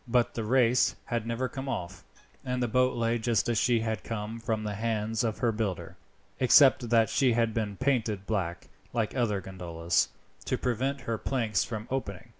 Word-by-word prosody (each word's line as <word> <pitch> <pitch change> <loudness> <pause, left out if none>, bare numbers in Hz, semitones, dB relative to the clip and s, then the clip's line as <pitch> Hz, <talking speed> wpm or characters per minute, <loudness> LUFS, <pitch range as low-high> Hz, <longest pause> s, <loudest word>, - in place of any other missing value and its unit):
But 120 0 +2
the 115 - -3
race 125 +1 +3
had 115 -2 -2
never 115 +2 -1
come 135 +1 -6
off, 90 -6 -5 0.4
and 125 -1 -1
the - - +1
boat 125 +2 +2
lay 115 0 +1
just 115 -2 +1
as 115 -2 +1
she 120 -2 +2
had 110 -1 -2
come 110 0 -5
from 110 -1 -2
the 105 -1 -3
hands 110 0 -1
of 110 -2 -1
her 120 - +1
builder, 105 -5 -3 0.4
except 130 -2 +6
that 115 -1 +4
she 130 -4 +2
had 115 -1 +1
been 105 -3 -2
painted 115 -7 0
black, 95 -6 -2 0.3
like 115 -1 -1
other 110 -6 0
gondolas, 85 -3 -1 0.4
to - - 0
prevent 130 +3 -1
her 115 -2 -3
planks 115 -7 0
from 110 -1 -6
opening. 100 -9 -4
115 Hz, 185 wpm, -29 LUFS, 105-125 Hz, 0.4 s, except